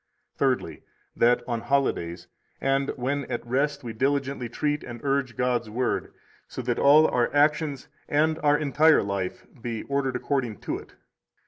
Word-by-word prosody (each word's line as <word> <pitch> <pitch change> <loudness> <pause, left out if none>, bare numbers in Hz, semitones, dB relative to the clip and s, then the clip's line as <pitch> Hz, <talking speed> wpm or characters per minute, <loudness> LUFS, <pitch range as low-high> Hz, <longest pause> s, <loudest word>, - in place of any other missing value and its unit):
Thirdly, - - 0 0.3
that 120 +1 +3
on 120 -2 -2
holidays 90 -12 -1 0.3
and 135 0 +1
when 140 +2 -2
at 120 - -4
rest 140 +3 0
we 115 -2 -5
diligently 135 0 -1
treat 150 +4 -1
and 120 -1 -8
urge 135 -3 0
God's 125 -3 0
Word, 120 +3 -1 0.4
so - - -6
that - - -1
all 150 +3 +7
our 120 -1 +1
actions 150 -1 +2 0.2
and 155 +2 +2
our 145 0 +3
entire 150 +2 +4
life 100 -2 -3 0.2
be 115 -1 -4
ordered 140 -2 -1
according 125 -5 -1
to - - -3
it. - - -16
135 Hz, 150 wpm, -26 LUFS, 120-145 Hz, 0.4 s, all